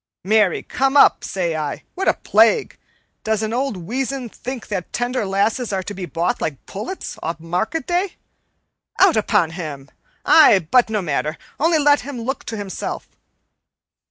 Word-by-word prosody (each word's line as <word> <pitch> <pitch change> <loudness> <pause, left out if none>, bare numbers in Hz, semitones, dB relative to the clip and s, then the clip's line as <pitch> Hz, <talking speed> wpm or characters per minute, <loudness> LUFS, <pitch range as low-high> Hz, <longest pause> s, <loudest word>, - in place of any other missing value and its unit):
Marry, 210 -1 +2
come 270 +2 +1
up, - - +6
say 175 -4 -2
I 150 -2 -4
what 385 +1 -3
a - - +4
plague 460 -4 +2 0.4
does 220 0 0
an 220 +1 -2
old 260 -3 -1
weazen 255 +7 -3
think 250 +2 -7
that 190 -4 -4
tender 245 -3 -1
lasses 210 +5 0
are 190 -1 -1
to 205 - -6
be 185 -2 -6
bought 170 +3 -1
like 140 -4 -4
pullets 220 - -6
o' - - -2
a 165 - -3
market 180 - -2
day? 360 +2 -1 0.8
Out 380 -4 +6
upon 175 -6 +2
him! 150 -5 -7 0.3
I 310 -10 +7
but 205 +8 +2
no 210 -3 -1
matter, 155 0 -2 0.2
only 325 +2 +3
let 290 -1 +4
him 270 -1 -7
look 255 +4 -4
to 220 - -5
himself." 200 -2 -5
220 Hz, 165 wpm, -20 LUFS, 180-270 Hz, 0.8 s, I